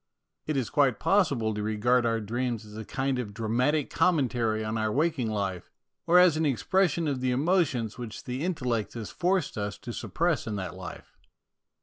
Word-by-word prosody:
It 150 -2 0
is 130 -4 -1
quite 140 -5 +3
possible 140 - +2
to 105 - -3
regard 120 +3 +2
our 115 0 +1
dreams 120 +1 -2
as 105 0 -12
a 110 - -5
kind 130 +3 -1
of 105 -5 -5
dramatic 125 +7 0
commentary 120 -10 +1
on 110 +1 -2
our 110 -1 0
waking 150 -3 +1
life, 100 -4 -3 0.4
or 175 +1 +6
as 180 -3 +7
an 160 - 0
expression 165 - +1
of 135 -3 -1
the 130 - +1
emotions 130 - +1
which 115 -3 -7
the 125 +2 -4
intel 165 -6 -2
lect 115 -4 -1
has 115 -3 -6
forced 180 - 0
us 100 0 -3
to 120 - -7
suppress 170 +1 -1
in 110 - -2
that 95 -2 -4
life. 90 -2 -10
125 Hz, 190 wpm, -28 LUFS, 110-150 Hz, 0.4 s, as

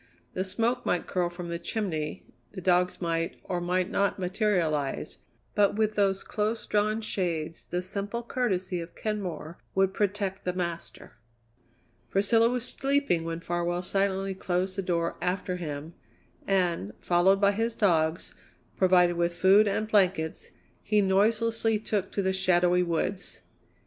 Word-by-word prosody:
The 185 - -1
smoke 225 +6 0
might 180 - 0
curl 180 -2 0
from 175 0 -7
the 170 0 -3
chimney, 170 -6 -3 0.3
the 195 - -6
dogs 180 0 +2
might, 165 0 -1
or 180 -2 -3
might 180 +2 0
not, 200 0 +1
materialize, 180 -7 -1 0.3
but 205 -1 +3
with 215 0 +1
those 195 -2 +1
close 215 +2 -2
drawn 215 +1 +1
shades 170 -6 -2
the 180 +1 -2
simple 205 +5 -4
courtesy 190 -8 -1
of 165 0 -10
Kenmore 180 -7 -4 0.2
would 190 0 +3
protect 200 -1 -1
the 180 - -1
master. 170 -2 -5 0.9
Priscilla 225 +4 +3
was 250 0 -2
sleeping 275 -12 0
when 165 0 -4
Farwell 175 0 -1
silently 195 0 0
closed 185 0 -2
the 195 - -1
door 170 -2 -1
after 180 0 -1
him, 155 -1 -6 0.5
and, 175 - +1
followed 180 +3 +3
by 200 0 +4
his 225 +3 -1
dogs, 165 -5 +1 0.4
provided 180 -2 +4
with 170 0 0
food 195 +4 +5
and 210 +2 0
blankets, 185 -6 +1 0.3
he 210 -1 +2
noiselessly 220 +3 +2
took 205 -2 -2
to 200 - 0
the 190 0 +1
shadowy 180 -1 +3
woods. 180 +3 -2
185 Hz, 145 wpm, -28 LUFS, 175-205 Hz, 0.9 s, food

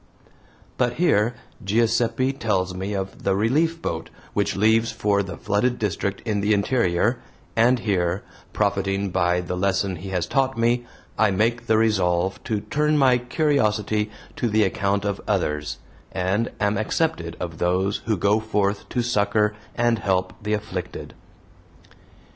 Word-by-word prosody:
But 120 -1 +2
here 120 -9 +2 0.3
Giuseppe 115 +5 +1
tells 95 -8 -1
me 95 +3 -4
of 95 0 -4
the 95 - +1
"Relief 150 +11 +1
Boat" 80 - -3 0.2
which - - 0
leaves 110 +2 +3
for 105 -2 +1
the 95 -1 -6
flooded 120 +5 0
district 100 -1 -2
in 105 -2 0
the 105 +1 +3
interior, 105 0 +1 0.4
and 120 +3 +4
here, 95 -5 0 0.3
profiting 100 -1 0
by 90 -1 +2
the 90 +1 -4
lesson 95 0 0
he 95 +4 -7
has 90 -3 -1
taught 135 +6 0
me, 120 +1 +1 0.3
I 110 -1 +5
make 115 +4 0
the 110 - +4
resolve 95 -4 +1
to 105 -2 -1
turn 150 +4 +1
my 130 -3 +4
curiosity 110 -6 +1 0.3
to 120 - 0
the 110 0 +3
account 100 +1 0
of 100 -1 -2
others, 75 0 -1 0.3
and 95 +5 0
am 105 0 +1
accepted 105 - -1
of 85 -3 -5
those 95 +3 +1
who 110 -3 +1
go 100 +4 +3
forth 105 -2 -1
to 125 - 0
succor 105 -2 +2 0.2
and 120 -1 +2
help 95 -3 0
the 105 +1 -1
afflicted. 95 -4 -5
105 Hz, 150 wpm, -23 LUFS, 95-115 Hz, 0.4 s, I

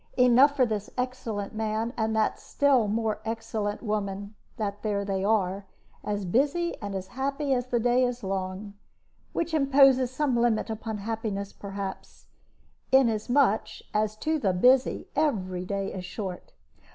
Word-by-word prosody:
Enough 255 +3 +6
for 260 - +4
this 215 -3 -3
excellent 245 -5 -3
man 220 +2 -2
and 220 -1 0
that 220 -1 +1
still 270 -6 +2
more 220 0 -1
excellent 220 -1 -3
woman 205 -2 -3 0.2
that 205 -1 -3
there 200 -2 -1
they 195 -1 -1
are, 195 -2 +1 0.4
as 205 -1 -2
busy 290 - +1
and 200 -2 -4
as 190 -1 -5
happy 275 +2 -1
as 250 -1 -1
the 245 -1 +1
day 245 +2 +3
is 245 -1 -2
long 190 +1 -4 0.6
which 335 -1 -2
imposes 270 -3 +5
some 260 0 0
limit 235 -1 +1
upon 220 0 -4
happiness, 205 -2 -4
perhaps, 195 -1 -7 0.7
inasmuch 245 -2 +3 0.3
as 215 0 +1
to 310 +8 -1
the 195 -8 +1
busy 250 +8 +3
every 185 -12 0
day 195 0 -3
is 185 - -5
short. 185 0 -6
220 Hz, 145 wpm, -27 LUFS, 200-255 Hz, 0.7 s, Enough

